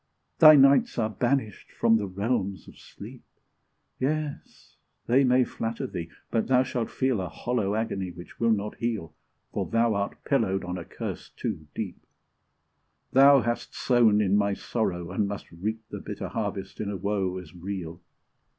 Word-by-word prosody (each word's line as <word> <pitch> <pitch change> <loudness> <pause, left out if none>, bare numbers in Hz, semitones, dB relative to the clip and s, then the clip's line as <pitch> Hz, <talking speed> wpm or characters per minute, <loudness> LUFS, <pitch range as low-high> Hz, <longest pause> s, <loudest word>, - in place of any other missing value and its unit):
Thy 155 -1 +10
nights 140 - +5
are 110 -2 0
banished 120 -1 -1
from 115 - +3
the 105 -2 -2
realms 100 0 -2
of - - -13
sleep: - - -12 0.8
Yes! 150 +2 -4 0.3
they 130 +4 +4
may 125 0 +4
flatter 115 +2 -4
thee, 85 -9 -5 0.2
but 115 - 0
thou 130 -1 +4
shall 120 -3 -2
feel 130 -6 0
A 90 - -4
hollow 110 -5 -1
agony 110 -4 -2
which 85 0 -12
will 115 - +2
not 105 -1 0
heal, 110 -8 -3 0.4
For - - -2
thou 115 0 +2
art 100 0 -3
pillowed 110 -9 +1
on 90 0 -4
a 85 - -8
curse - - -6
too 80 - -5
deep; - - -5 1.1
Thou 140 0 +7
hast 120 +1 -3
sown 115 -4 +4
in 100 -1 +2
my 100 -1 +2
sorrow, 90 -8 -2
and 100 +2 0
must 100 -1 -6
reap 110 +7 -4
The - - -5
bitter - - -6
harvest - - -4
in 105 - -3
a 100 - -3
woe 95 -1 -1
as 90 -3 -10
real! 90 -2 -6
110 Hz, 165 wpm, -27 LUFS, 95-125 Hz, 1.1 s, Thy